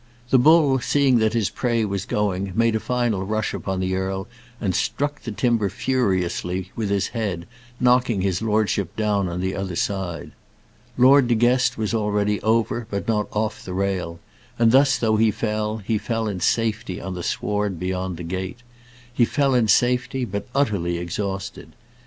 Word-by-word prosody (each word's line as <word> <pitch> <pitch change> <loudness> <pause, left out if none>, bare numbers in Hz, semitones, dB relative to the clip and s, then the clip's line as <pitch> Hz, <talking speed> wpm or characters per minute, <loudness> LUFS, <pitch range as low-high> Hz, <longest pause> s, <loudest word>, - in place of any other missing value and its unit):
The 130 - +6
bull 145 -1 +5
seeing 135 -1 +3
that 110 0 +2
his 115 -4 0
prey 115 -3 0
was 100 -2 -3
going, 100 -2 -1
made 115 0 +2
a - - +1
final 120 -5 -1
rush 110 +2 -2
upon 95 -1 -3
the 95 0 -1
earl 95 +1 -3 0.3
and 95 -4 -1
struck 145 +10 -1
the 115 - -5
timber 115 -2 +1
furiously 95 -5 -1
with 110 -4 -2
his 100 -1 0
head, 100 -8 -3 0.3
knocking 125 -4 +3
his 95 0 0
lordship 105 -4 0
down 105 -4 0
on 85 +1 -4
the 95 +1 -1
other 95 -2 -4
side. 95 -3 -3 0.7
Lord 130 +1 +6
De 120 - +2
Guest 125 +2 +2
was 110 0 -2
already 105 -1 0
over, 115 +1 0
but 100 -1 -4
not 105 -2 +1
off 105 0 -2
the 90 - -6
rail; 95 -3 -2 0.4
and 115 -1 +4
thus, 135 +1 +5
though 110 -2 +1
he 110 0 +4
fell, 105 0 -2
he 110 +1 -2
fell 115 0 -2
in 100 -3 -3
safety 110 0 0
on 95 +1 -5
the 90 - -5
sward 105 0 -2
beyond 90 -1 -3
the 85 - -7
gate. 95 +7 -5 0.5
He 120 - +3
fell 140 +3 +2
in 120 -3 +3
safety, 125 +4 +2
but 100 -2 -5
utterly 100 -11 +1
exhausted. 95 +3 -5
105 Hz, 175 wpm, -23 LUFS, 95-120 Hz, 0.7 s, The